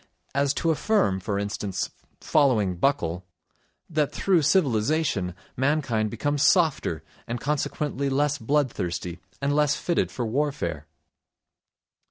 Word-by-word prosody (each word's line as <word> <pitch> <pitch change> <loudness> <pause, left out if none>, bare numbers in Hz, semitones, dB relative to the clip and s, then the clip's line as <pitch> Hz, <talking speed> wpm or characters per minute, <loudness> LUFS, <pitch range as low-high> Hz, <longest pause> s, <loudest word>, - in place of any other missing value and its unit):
as 140 0 +2
to 165 +3 +1
affirm, 145 - +1
for 100 +2 -2
instance, 100 -1 -3 0.3
following 115 -11 +2
Buckle, 90 -6 0 0.6
that 155 -3 0
through 185 -4 +2
civilisation 135 - +1 0.2
mankind 130 -6 +1
becomes 140 +6 -1
softer, 155 - +3 0.2
and 120 +1 -3
consequently 145 0 -1
less 145 +1 +1
bloodthirsty 110 - -1 0.2
and 140 +1 +1
less 150 -1 +3
fitted 170 +2 0
for 120 - -3
warfare. 110 - -2
135 Hz, 110 wpm, -25 LUFS, 100-150 Hz, 0.6 s, softer